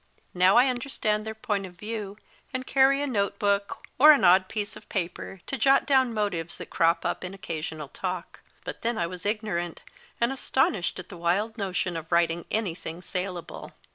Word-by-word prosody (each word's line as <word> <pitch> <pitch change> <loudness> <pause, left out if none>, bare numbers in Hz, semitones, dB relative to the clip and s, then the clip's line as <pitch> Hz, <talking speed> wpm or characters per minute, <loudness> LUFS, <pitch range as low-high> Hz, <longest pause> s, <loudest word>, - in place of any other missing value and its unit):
Now 185 +2 +5
I 245 - +7
understand 245 -4 -1
their 220 - -4
point 205 -2 -2
of 180 - -15
view, 210 0 -5 0.3
and 255 -1 -3
carry 275 +1 +4
a - - 0
note 205 -7 -1
book, 200 -1 0 0.2
or 305 +3 +10
an 290 - +4
odd 185 +1 +6
piece 210 -2 -4
of - - -14
paper, 180 0 -4
to 270 - -4
jot 270 +4 +4
down 260 -3 +3
motives 200 -7 -2
that - - -9
crop 165 0 +2
up - - -1
in 185 +1 -6
occasional 160 -4 -5
talk, 185 +2 -5 0.2
but - - -6
then 235 0 -1
I 170 - +1
was 180 +2 -5
ignorant, 205 -6 -2 0.4
and 235 +2 +2
astonished 265 -8 0
at 185 -1 -8
the 180 - -9
wild 185 +6 0
notion 185 -4 -2
of 165 +1 -6
writing 170 0 +2
anything 175 -5 -3
saleable. 180 -2 -5
200 Hz, 185 wpm, -27 LUFS, 175-225 Hz, 0.4 s, or